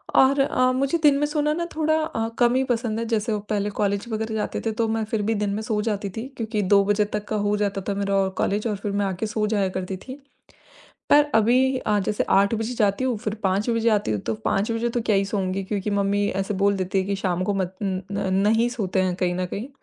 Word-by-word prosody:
और 275 +1 +5
अ, 255 -2 +3
मुझे 275 +5 +1
दिन 285 -2 +6
में 295 - +2
सोना 300 0 0
ना 340 +1 -2
थोड़ा 315 0 +2
अ, 225 -7 -2
कम 240 +1 +4
ही 265 - +3
पसंद 230 -3 -1
है। 230 - -2
जैसे 220 +1 0
वो 210 - -1
पहले 205 -1 0
कॉलेज 200 +1 0
वग़ैरह 220 0 -3
जाते 210 - -2
थे, 225 - +1
तो 225 +1 0
मैं 220 0 -1
फिर 220 -1 -2
भी - - +3
दिन 205 0 -1
में 215 - -2
सो 215 -1 -1
जाती 205 -2 -2
थी 240 +4 -4
क्योंकि 220 -2 -2
2 200 0 +6
बजे 205 0 +2
तक 210 - -3
का 215 - -1
हो 205 - +2
जाता 200 -1 -1
था - - +1
मेरा 200 0 -1
और 195 -1 +2
कॉलेज, 210 +3 0
और 210 - -1
फिर 200 +1 -4
मैं 200 0 0
आके 190 +2 -2
सो 215 0 -1
जाया 205 -3 +1
करती 185 0 -4
थी। 260 +8 -10 0.9
पर 295 0 +7
अभी 255 +4 +3
अ, 210 -4 0
जैसे 205 +2 -1
8 200 +2 +4
बजे 225 +3 -3
जाती 205 0 +1
हूँ, 250 -4 0
फिर 215 -1 -3
5 195 +4 +1
बजे 230 0 +2
आती 205 - +1
हूँ, 105 - 0
तो 110 - -2
5 205 +4 +1
बजे 230 +1 -1
तो 235 0 -1
क्या 215 -2 +1
ही 195 - +2
सोऊँगी 195 -1 -2
क्योंकि 205 +1 -3
मम्मी 200 0 +1
ऐसे 200 +2 -3
बोल 200 0 +4
देती 185 +1 -1
है - - 0
कि 200 0 -1
शाम 185 -2 -1
को 205 - 0
मत 185 -1 -2
न 190 -2 -1
न 200 -1 -1
नहीं 225 +3 +3
सोते 200 -6 -1
हैं 180 -1 0
कहीं 180 -1 0
ना 185 - -1
कहीं। 205 +7 -5
210 Hz, 260 wpm, -24 LUFS, 200-230 Hz, 0.9 s, पर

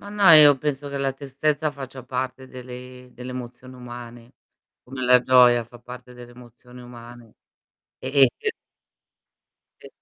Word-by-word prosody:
Ma 205 - -12
no, 205 -3 +4
io 145 -3 +8
penso 145 -1 -4
che 140 0 -5
la 135 -1 -1
tristezza 145 +2 -2
faccia 135 -2 -10
parte 130 +1 -5
delle 125 0 -11
delle 125 +1 -9
emozioni 125 +1 -9
umane, 120 -1 -11 0.5
come 130 0 -7
la 125 0 +5
gioia 125 -2 +4
fa 120 +1 -16
parte 125 +1 -12
delle 120 0 -13
emozioni 125 +1 -16
umane. 120 -1 -14 0.6
E 130 - -7 0.2
e - - +3
che 445 - -2 1.3
E - - -12
125 Hz, 150 wpm, -23 LUFS, 120-135 Hz, 1.3 s, io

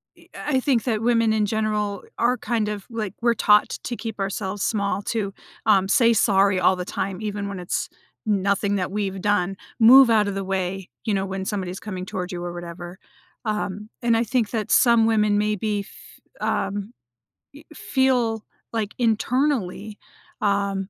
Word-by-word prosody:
i - - -22
I 295 -3 -2
I - - +4
think 255 -4 +1
that 220 -4 -1
women 230 -1 +3
in 215 -1 +2
general 210 -1 -1
are, 245 +2 +2
kind 220 -1 -1
of 205 -2 -5
like, 215 -4 -4
we're 235 0 +3
taught 210 -1 +4
to 240 - -3
keep 225 -3 -6
ourselves 195 0 -3
small, 200 -2 0
too, 205 -2 -2 0.3
um, 195 -3 +4
say 235 +2 +4
sorry 195 -3 +3
all 185 +1 +4
the 180 -1 -5
time, 190 +2 -4
even 205 -1 -3
when 195 -2 -5
it's 180 - -3 0.4
nothing 200 -1 +1
that 185 -2 -2
we've 195 -2 -3
done, 195 -2 +1 0.2
move 245 +2 +8
out 215 -2 +4
of 200 - -3
the 195 - -2
way, 190 0 -3
you 215 - -1
know, 195 -1 0
when 190 0 -4
somebody's 190 -3 -3
coming 185 -4 -6
towards 185 0 -5
you 175 -1 -5
or 175 - -4
whatever. 175 +1 -8 0.5
Um, 210 0 -3
and 235 -2 +3
I 230 - +2
think 235 -2 0
that 220 -3 -2
some 235 -2 +5
women 210 -2 +3
maybe 210 0 0
f 200 - -17
um, 200 +3 -2 0.6
i 295 - -12
feel, 250 -6 +1 0.3
like, 220 -2 -2
internally, 225 -3 0 0.4
um, 200 -1 0
210 Hz, 175 wpm, -23 LUFS, 195-225 Hz, 0.6 s, move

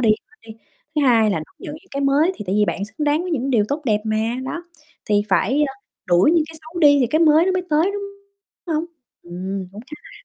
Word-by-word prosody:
đi 230 -3 +4
bớt 395 - -3
đi, 225 - -11 0.4
thứ 300 - +1
hai 230 -5 +4
là 185 - 0
đón 155 - -10
nhận 310 -6 -7
những 355 +5 -15
cái 280 - -3
mới 285 +6 +3
thì - - -7
tại 190 - 0
vì 210 - +4
bạn 200 -1 -2
xứng 220 +8 -5
đáng 300 +3 +2
với 365 - -5
những 275 -4 -1
điều 225 -5 +3
tốt 295 +2 -2
đẹp 210 -3 +1
mà, 215 0 0 0.3
đó, 335 +6 -5 0.4
thì 205 -1 +2
phải, 255 +9 +2
a, - - -6 0.3
đuổi 175 - +4
những 335 -2 +3
cái 320 - -10
xấu 320 +2 -8
đi 290 -2 +6
thì 250 - +3
cái 310 - +1
mới 315 0 +5
nó 380 - +2
mới 370 -1 0
tới, 315 +6 +3
đúng 405 0 -4 0.7
hông? 310 +2 0 0.4
Ừm, 185 +2 -5
cũng 205 - -9
khá 300 +6 -11
là - - -14
280 Hz, 260 wpm, -21 LUFS, 210-315 Hz, 0.7 s, đi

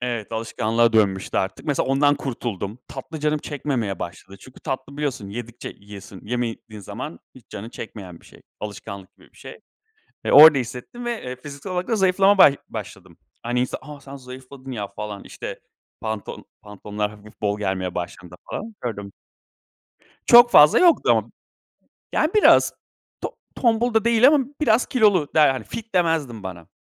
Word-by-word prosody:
Evet, 120 -3 -4
alışkanlığa 115 +1 +1
dönmüştü 100 -3 +1
artık. 95 +10 -3
Mesela 145 -2 0
ondan 145 +2 +3
kurtuldum. 115 -6 -5
Tatlı 145 +3 -8
canım 150 0 +1
çekmemeye 130 - -3
başladı. 95 +3 -8
Çünkü 130 - -15
tatlı 140 +2 -5
biliyorsun, 135 -9 -3
yedikçe 120 +2 -7
yiyiyorsun. 100 -1 -12
Yemediğin 115 -2 -4
zaman 115 - -7 0.2
hiç 130 - -17
canın 105 +3 -7
çekmeyen 95 -7 -9
bir - - -20
şey. - - -18 0.2
Alışkanlık 100 -2 -8
gibi - - -22
bir - - -26
şey. - - -11 0.6
E, - - 0
orada 150 -1 +10
hissettim 125 - -6
ve, 235 -2 -3
eee, 125 0 -5
fiziksel 140 +7 -8
olarak 180 +3 -2
da 225 - +1
zayıflama 195 +1 +4
ba 150 - +9 0.2
başladım. - - -9 0.3
Hani 120 +1 -1
insan, 125 - -2
"A, 150 -1 -10
sen 140 0 -10
zayıfladın 130 +1 -11
ya." 105 -4 -4
falan, 105 -1 -7
işte, - - -8 0.4
pantolon 110 -2 -5 0.2
pantolonlar 105 0 -5
hafif 105 +1 -16
bol 105 0 0
gelmeye 95 -3 -2
başladığında 90 0 -6 0.2
falan 220 +1 -6
gördüm. 100 -5 -5 1.1
Çok 240 0 +8
fazla 150 +1 +7
yoktu. 345 -2 +4 0.9
Yani 310 - +2
biraz 425 - +6 0.5
to - - -5 0.2
tombul 235 -1 +1
da 220 - +3
değil 235 +1 +5
ama 290 -3 +4 0.2
biraz 235 -5 +3
kilolu 205 - +3
der 155 -3 +6
Hani 130 -1 -4
fit 225 -3 -8
demezdim 160 - 0
bana. 90 -3 -8
125 Hz, 160 wpm, -22 LUFS, 105-155 Hz, 1.1 s, orada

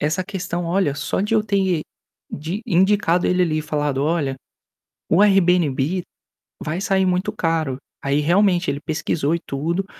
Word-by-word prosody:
Essa 155 +5 0
questão, 180 -3 -4
olha, 170 -4 +1
só 150 +5 -2
de 210 +3 0
eu 215 - +3
ter 190 -6 +1 0.5
de 165 +8 -4
indicado 185 -2 +2
ele 180 0 +2
ali 155 -3 0
e 155 - -2
falado: 145 -3 -1
"Olha, 150 -4 0 0.8
o 175 +5 +4
Airbnb 180 -4 +3 0.6
vai 160 +5 -3
sair 190 -1 +2
muito 185 +3 0
caro". 165 - -1 0.3
Aí, 140 +1 +1
realmente, 180 +2 +2
ele 140 - -4
pesquisou 155 -1 -1
e - - -3
tudo, 170 +7 -2
170 Hz, 155 wpm, -21 LUFS, 150-190 Hz, 0.8 s, o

